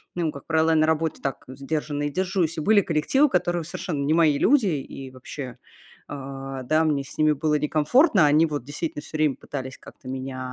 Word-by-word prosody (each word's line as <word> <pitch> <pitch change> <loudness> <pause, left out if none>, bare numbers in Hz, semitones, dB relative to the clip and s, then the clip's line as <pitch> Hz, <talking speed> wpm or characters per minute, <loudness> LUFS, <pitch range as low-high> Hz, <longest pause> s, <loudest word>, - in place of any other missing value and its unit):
Ну, 170 -3 0
и - - -3
как 140 - -11
правило, 160 0 +2
я 165 - +4
на 155 0 +3
работе 160 0 0
так 135 -2 -4
сдержанно 145 +2 -3
и 145 - 0
держусь. 180 -1 -1
И - - -1
были 210 +5 +5
коллективы, 180 - +2
которые, 175 - 0
совершенно 155 -4 -4
не 155 - +2
мои 160 -4 +4
люди, 250 - +4
и 135 -4 -4
вообще, 130 0 -8 0.5
а, 135 -1 -6
да, 155 +5 +2
мне 145 -3 +1
с 135 - -13
ними 155 0 +4
было 150 +1 0
некомфортно. 165 - +3
Они 150 +3 +4
вот 145 -5 -4
действительно 145 +2 -5
всё - - -10
время 150 -3 +2
пытались 130 -2 -7
как-то 130 - -15
меня, 130 0 -5
150 Hz, 205 wpm, -24 LUFS, 140-165 Hz, 0.5 s, были